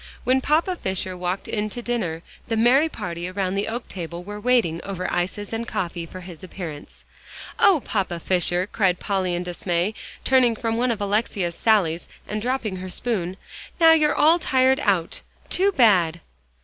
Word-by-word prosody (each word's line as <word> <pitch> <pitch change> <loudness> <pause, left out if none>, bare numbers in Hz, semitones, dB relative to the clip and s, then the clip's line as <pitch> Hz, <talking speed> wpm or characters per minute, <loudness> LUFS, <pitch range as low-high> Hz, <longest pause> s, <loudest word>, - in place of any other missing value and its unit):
When 260 +1 +2
Papa 325 +6 +2
Fisher 190 - -3
walked 180 +1 -3
in 215 -1 -2
to 240 - -6
dinner, 180 -10 -2 0.2
the 225 - -1
merry 260 +8 +4
party 170 - -5
around 185 0 -2
the 200 +1 -1
oak 235 +3 -4
table 170 -1 -6
were 205 +2 -7
waiting 210 -9 +2
over 190 -2 -5
the - - -2
ices 185 +4 -2
and 230 +1 -3
coffee 175 -6 -3
for 185 +2 -9
his 180 -2 -11
appearance. 165 -5 -8 0.5
"Oh, 350 -9 +5
Papa 190 -5 -1
Fisher!" 180 0 +1
cried 190 -3 +1
Polly 190 -3 -1
in 175 - -2
dismay, 175 +2 -1 0.3
turning 255 -3 +4
from 225 +1 -2
one 245 +2 +1
of 225 -3 -1
Alexia's 200 -3 0
sallies, 175 -6 +1 0.2
and 210 0 -3
dropping 235 -5 -2
her 185 +1 -6
spoon. 190 -3 -2 0.4
"Now 325 -1 +8
you're 305 -2 +4
all 325 +3 +5
tired 265 -2 +3
out 190 - 0 0.3
too 390 +2 +3
bad!" 185 - +4
200 Hz, 175 wpm, -23 LUFS, 180-240 Hz, 0.5 s, Now